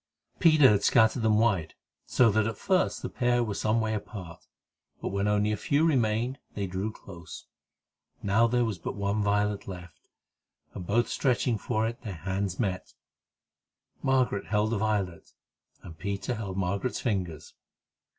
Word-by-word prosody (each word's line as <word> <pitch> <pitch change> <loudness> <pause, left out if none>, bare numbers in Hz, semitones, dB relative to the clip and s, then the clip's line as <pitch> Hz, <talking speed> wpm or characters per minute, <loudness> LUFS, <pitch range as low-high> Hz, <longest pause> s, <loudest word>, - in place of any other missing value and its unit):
Peter 155 -5 +7
had 100 -1 +2
scattered 110 +1 +4
them 110 -1 +3
wide, 100 -8 +1 0.3
so 120 -3 +4
that 110 +1 +2
at 110 - -4
first 185 -2 +1
the - - -1
pair 120 -1 +1
were 110 -3 -3
some 110 +3 +1
way 110 -1 0
apart, 100 -5 -7 0.5
but - - -3
when 100 +1 -1
only 105 0 +2
a - - +1
few 145 +9 +1
remained, 125 -2 +1 0.2
they 100 - -2
drew 95 +4 -3
close. 85 -6 -11 0.8
Now 110 +4 +3
there 120 +1 +2
was 105 -6 -3
but - - -5
one 100 +1 -1
violet 105 0 0
left, 90 -6 -10 0.7
and, 90 - -7
both 120 +4 +2
stretching 120 -3 +1
for 110 +3 -1
it, 115 +1 -4
their 105 -5 -6
hands 95 +2 -3
met. 95 -5 -2 1.1
Margaret 130 -7 +1
held 105 +1 +1
the 115 - 0
violet, 100 -5 -2 0.5
and 80 -2 -11
Peter 100 +6 -3
held 100 -5 -5
Margaret's 100 +5 -1
fingers. 90 - -3
105 Hz, 160 wpm, -28 LUFS, 95-115 Hz, 1.1 s, Peter